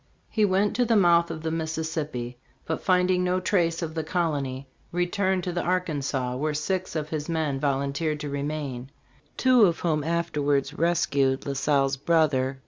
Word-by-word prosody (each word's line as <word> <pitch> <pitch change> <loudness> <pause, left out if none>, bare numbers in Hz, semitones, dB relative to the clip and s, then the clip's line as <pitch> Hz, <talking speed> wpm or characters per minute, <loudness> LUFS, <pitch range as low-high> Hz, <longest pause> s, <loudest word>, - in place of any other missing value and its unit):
He 215 -2 +3
went 200 +2 +1
to 250 - +4
the 230 -1 +2
mouth 170 -4 +4
of 160 -1 -6
the 160 - -1
Mississippi, 160 -6 -3 0.3
but 160 - -3
find 180 0 +3
ing 180 0 +2
no 180 +1 +1
trace 175 -3 +1
of 160 -1 -4
the 160 -1 -2
colony, 145 -6 -2 0.2
returned 185 +1 0
to 180 - -2
the 175 0 -1
Arkansas, 145 -8 -1
where 150 +2 -1
six 185 +5 -2
of 155 -1 -2
his 155 0 -4
men 155 -5 -1
volunteered 140 +2 -1
to 145 - -4
remain, 140 -3 -4 0.5
two 255 -4 +5
of 170 -3 0
whom 155 -4 0
afterwards 150 -4 0
rescued 140 -6 +1
La 140 - -2
Salle's 135 -1 +1
brother. 140 -4 +1
160 Hz, 170 wpm, -26 LUFS, 140-175 Hz, 0.5 s, two